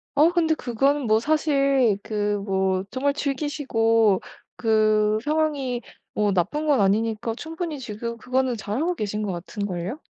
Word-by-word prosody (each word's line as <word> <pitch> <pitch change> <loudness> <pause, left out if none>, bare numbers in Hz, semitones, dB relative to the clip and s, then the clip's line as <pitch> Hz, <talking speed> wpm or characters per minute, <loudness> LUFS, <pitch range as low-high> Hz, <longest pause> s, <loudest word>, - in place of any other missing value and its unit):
어 300 +3 +6
근데 325 -2 +3
그거는 275 +2 0
뭐 215 0 +4
사실 275 -5 +2
그 210 -1 -1 0.2
뭐 190 -1 0
정말 280 +2 0
즐기시고 245 -8 +1 0.4
그 215 -2 +3
상황이 295 -5 0 0.3
뭐 210 -1 +1
나쁜 200 - 0
건 290 -4 +4
아니니까 220 +3 +1
충분히 320 +2 -5
지금 235 -1 -5
그거는 255 0 0
잘하고 275 - -2
계신 210 -5 -3
것 205 - -2
같은 185 +4 -5
걸요. 185 - -4
235 Hz, 280 characters per minute, -24 LUFS, 210-285 Hz, 0.4 s, 어